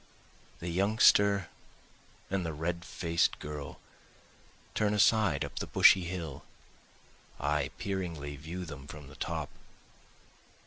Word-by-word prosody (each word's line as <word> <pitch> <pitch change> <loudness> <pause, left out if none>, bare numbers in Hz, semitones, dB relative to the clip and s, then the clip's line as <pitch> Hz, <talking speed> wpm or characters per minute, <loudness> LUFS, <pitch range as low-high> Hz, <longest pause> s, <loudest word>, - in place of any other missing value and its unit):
The 85 - -5
youngster 100 0 +4 0.8
and 95 -1 0
the 80 -2 -3
red 85 +3 -3
faced 85 -1 0
girl 75 -2 -7 0.9
turn 105 0 +1
aside 105 -7 +3
up - - -6
the - - -4
bushy 95 -2 +6
hill, 85 -5 -5 1.0
I 70 0 0
peeringly 85 -7 -4
view 85 +5 -6
them 75 -4 -9
from 75 -2 -10
the 75 - -13
top. - - -3
85 Hz, 115 wpm, -31 LUFS, 75-95 Hz, 1.0 s, bushy